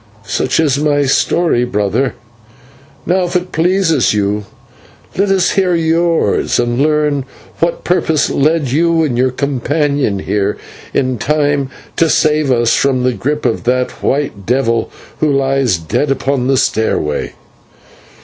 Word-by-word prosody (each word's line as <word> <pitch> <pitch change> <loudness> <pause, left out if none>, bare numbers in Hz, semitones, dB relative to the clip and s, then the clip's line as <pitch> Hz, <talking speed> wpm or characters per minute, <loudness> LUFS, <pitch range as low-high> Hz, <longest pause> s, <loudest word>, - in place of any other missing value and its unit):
Such - - -1
is 145 -4 +2
my 145 -1 +1
story, 135 0 +1
brother; 120 +2 -1 0.9
now, 185 +1 +1
if 175 - -5
it 180 0 -1
pleases 165 - +2
you, 105 0 -1 0.7
let 200 +1 +1
us 190 -2 +2
hear 185 -3 +1
yours, 165 0 +1
and 120 +1 0
learn 150 -2 +1 0.4
what 170 0 -1
purpose 160 -4 +1
led 150 -2 +1
you 165 +3 +2
and 140 -6 -1
your 130 +2 +2
companion 140 -2 -1
here 100 +1 -1 0.3
in 130 -3 -1
time 145 0 0 0.3
to 165 - +3
save 155 -3 +2
us 120 -2 +2
from 130 -2 +1
the 125 0 +1
group 145 +8 -3
of 115 - 0
that 125 +1 +1
white 135 -8 -1
devil 115 -2 +1 0.3
who 155 -1 +2
lies 135 -6 +1
dead 80 - -2
upon 135 -1 0
the 135 0 +2
stairway." 110 -11 -1
140 Hz, 140 wpm, -15 LUFS, 125-160 Hz, 0.9 s, to